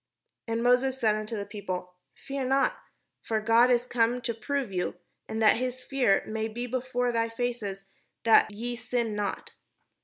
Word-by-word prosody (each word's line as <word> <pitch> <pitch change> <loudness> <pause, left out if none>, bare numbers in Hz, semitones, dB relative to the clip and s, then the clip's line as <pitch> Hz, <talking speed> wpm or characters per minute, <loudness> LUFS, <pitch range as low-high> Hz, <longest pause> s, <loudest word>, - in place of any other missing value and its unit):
And 230 0 -1
Moses 255 +2 +3
said 220 -4 +3
unto 215 +1 -3
the 200 - -3
people: 185 -4 -5 0.2
"Fear 275 -1 -4
not: 270 +1 +2 0.4
for 220 -1 -1
God 230 +3 +5
is 245 -1 +3
come 240 0 +1
to 235 - -2
prove 275 0 -2
you, 180 -1 -1 0.3
and 220 - -3
that 215 - +6
his 255 +1 -3
fear 250 -8 +2
may 220 0 -2
be 235 +3 -5
before 245 0 -1
their 230 -1 0
faces, 225 -5 -3 0.4
that 225 -1 +6
ye 235 +4 -4
sin 235 -2 -2
not." 205 -1 -3
230 Hz, 165 wpm, -28 LUFS, 215-250 Hz, 0.4 s, that